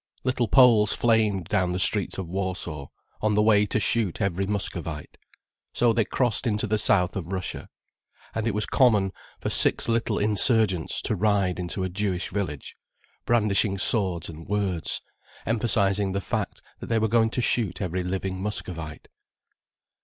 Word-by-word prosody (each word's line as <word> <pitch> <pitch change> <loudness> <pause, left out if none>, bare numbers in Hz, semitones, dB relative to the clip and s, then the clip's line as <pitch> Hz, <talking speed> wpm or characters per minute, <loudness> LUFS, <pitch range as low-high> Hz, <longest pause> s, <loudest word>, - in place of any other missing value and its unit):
Little 125 -2 0
Poles 115 -6 +5
flamed 110 -6 +1
down 90 0 0
the 90 - -2
streets 95 0 +2
of 95 -3 -4
Warsaw, 90 -6 -4 0.3
on 105 -1 +1
the 105 - +3
way 105 -1 +4
to 110 - 0
shoot 105 -3 0
every 95 0 -1
Muscovite. 85 -6 -4 0.6
So 120 -2 +3
they 115 -1 +1
crossed 120 +1 0
into 105 -1 0
the 110 0 0
south 90 -3 +2
of 90 -1 -5
Russia, 95 -2 -5 0.6
and 110 0 -2
it 110 - -1
was 105 - 0
common 105 -8 +3 0.3
for - - -3
six - - +3
little 115 -2 0
insurgents 105 -4 +2
to 110 - 0
ride 100 -2 +1
into 90 +2 -3
a 95 - -2
Jewish 95 -1 -2
village, 90 -9 -4 0.5
brandishing 105 -3 +2
swords 95 -5 -1
and 80 0 -10
words, 100 -5 -2 0.4
emphasizing 105 -4 +1
the 100 - -1
fact - - -4 0.2
that - - -8
they 115 - +1
were 110 0 +2
going 115 0 +3
to 125 - -2
shoot 115 -7 0
every 90 -1 -2
living 95 +1 -3
Muscovite. 85 -6 -5
100 Hz, 160 wpm, -25 LUFS, 90-110 Hz, 0.6 s, Poles